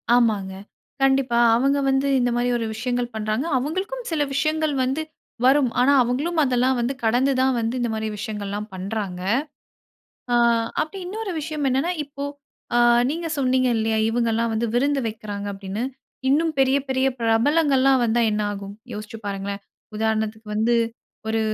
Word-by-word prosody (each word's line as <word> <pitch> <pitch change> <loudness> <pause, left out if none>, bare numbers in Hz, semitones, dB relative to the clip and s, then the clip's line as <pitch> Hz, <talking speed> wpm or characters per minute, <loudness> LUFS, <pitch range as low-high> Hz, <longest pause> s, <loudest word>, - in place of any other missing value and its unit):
ஆமாங்க. 210 -6 +2 0.5
கண்டிப்பா 270 -3 +3 0.2
அவங்க 275 +4 +2
வந்து 270 +1 +2
இந்த 245 0 +2
மாதிரி 240 +1 +1
ஒரு 230 - -2
விஷயங்கள் 245 +1 -1
பண்றாங்க. 215 +5 -1
அவங்களுக்கும் 375 - -3
சில 315 -2 0
விஷயங்கள் 310 +2 0
வந்து 265 +4 -1 0.4
வரும். 265 0 +5
ஆனா 265 +3 +5
அவங்களும் 290 +8 -1
அதெல்லாம் 255 -1 +2
வந்து 240 +3 0
கடந்து 245 +5 +3
தான் 260 0 +2
வந்து 230 +2 -1
இந்த 240 -1 0
மாதிரி 220 0 -2
விஷயங்கள்லாம் 210 0 -4
பண்றாங்க. 190 -1 -4 1.1
ஆ - - +3 0.5
அப்படி 315 +6 -3
இன்னொரு 415 +1 -4
விஷயம் 300 -1 -3
என்னன்னா 270 +7 +1
இப்போ 280 0 -7 0.5
அ - - +5 0.3
நீங்க 330 +2 -3
சொன்னீங்க 255 -1 +2
இல்லையா? 220 0 0
இவங்கலாம் 230 0 +1
வந்து 225 +2 0
விருந்து 280 +3 +2
வைக்கிறாங்க 210 -2 -6
அப்படின்னு. 195 +2 -5 0.5
இன்னும் 315 +4 +2
பெரிய 270 0 +4
பெரிய 265 0 +1
பிரபலங்கள்லாம் 265 +3 +3
வந்தா 235 +1 +2
என்ன 210 0 0
ஆகும். 200 0 -7 0.2
யோசிச்சு 215 +1 -7
பாருங்களேன். 200 0 -4 0.3
உதாரணத்துக்கு 220 0 -1
வந்து 220 +3 +2 0.5
ஒரு 225 0 +1
245 Hz, 145 wpm, -23 LUFS, 220-275 Hz, 1.1 s, வரும்